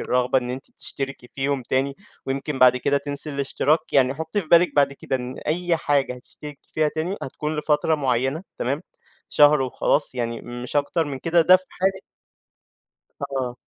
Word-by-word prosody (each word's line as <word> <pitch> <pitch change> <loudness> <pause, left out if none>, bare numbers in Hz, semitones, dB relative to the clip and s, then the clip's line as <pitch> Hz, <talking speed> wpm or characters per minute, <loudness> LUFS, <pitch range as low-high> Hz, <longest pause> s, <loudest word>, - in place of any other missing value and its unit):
الرغبة 125 +1 +2
إن 125 -1 -5
أنتِ 130 +2 -7
تشتركي 135 -2 -6
فيهم 135 0 -2
تاني 135 +3 -1 0.3
ويمكن 135 +1 -3
بعد 125 -1 +6
كده 140 +3 +1
تنسي 145 +1 -3
الاشتراك، 145 +3 0
يعني 130 -1 +4
حُطّي 160 +7 -2
في 165 - -11
بالِك 170 +2 +5
بعد 140 -1 +4
كده 135 - -3
إن 125 0 -6
أي 175 +2 +1
حاجة 140 -4 0
هتشتركي 145 +3 -12
فيها 155 -1 +2
تاني، 160 +6 -3
هتكون 150 +3 -4
لفترة 150 +1 +1
معيّنة، 135 +2 0 0.2
تمام؟ 140 +6 -1 0.5
شهر 150 0 +5
وخلاص 130 +2 +1
يعني 115 -2 -3
مش 120 +3 -6
أكتر 145 +3 +1
من 140 -3 -5
كده، 170 +4 +2
ده 185 +3 +7
في 185 - -14
حالة 190 +1 -1 1.2
آه. 130 -3 -3
140 Hz, 165 wpm, -23 LUFS, 130-155 Hz, 1.2 s, ده